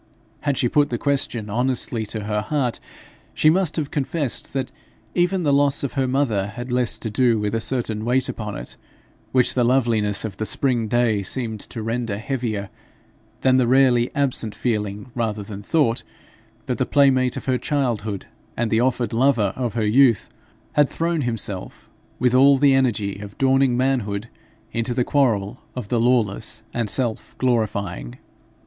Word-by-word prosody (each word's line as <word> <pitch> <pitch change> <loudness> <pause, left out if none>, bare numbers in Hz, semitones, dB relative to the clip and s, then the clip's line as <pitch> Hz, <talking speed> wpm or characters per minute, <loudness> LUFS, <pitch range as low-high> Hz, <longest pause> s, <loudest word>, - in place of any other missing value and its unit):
Had 145 -3 -1
she 120 - +2
put 145 +4 +2
the 120 - -1
question 135 -5 -1
honestly 120 -1 0
to 110 0 -4
her 105 0 -1
heart, 125 +1 -1 0.6
she 155 - +5
must 180 -2 +1
have 150 -4 -2
confessed 145 -2 -2
that 135 -2 -2 0.4
even 180 +1 +1
the 145 -2 +2
loss 140 0 +3
of 140 - -2
her 135 -2 0
mother 125 -7 +1
had 120 +4 -7
less 125 -1 +1
to 110 - -5
do 120 +1 +3
with 105 0 -2
a 115 - 0
certain 115 -4 -2
weight 125 +2 +1
upon 105 -2 -5
it, - - -8 0.5
which 125 -2 +3
the 125 - +2
loveliness 115 -5 +1
of 100 -4 -6
the 110 - -2
spring 120 0 0
day 115 -2 +2
seemed 110 +2 -3
to 110 +2 -7
render 115 -2 -2
heavier, 110 -5 -3 0.7
than 130 -1 +4
the 125 -2 +3
rarely 125 -2 +4
absent 130 -6 0
feeling 105 -1 -2
rather 110 -3 -2
than 100 0 -8
thought, 120 -1 +1 0.6
that - - -2
the - - +2
playmate 130 -3 +3
of - - -6
her 130 -2 +1
childhood, 110 -8 -1 0.3
and 115 -1 -1
the 110 +1 +3
offered 125 -2 0
lover 115 -5 +2
of 120 -3 -3
her 110 -2 0
youth, 115 -1 +4 0.4
had 145 -2 +4
thrown 165 -1 -1
himself 110 -6 -4 0.3
with 125 0 +2
all 135 +2 +6
the 140 0 +5
energy 110 -7 +1
of 100 0 -10
dawning 135 -2 +3
manhood 115 -5 -1 0.4
into 115 +1 -2
the 125 - +2
quarrel 115 -9 +1 0.2
of 120 -5 -6
the 120 - +1
lawless 110 -2 +1
and 115 -3 -1
self 120 0 -2
glorifying. 100 - -1
120 Hz, 170 wpm, -22 LUFS, 110-135 Hz, 0.7 s, all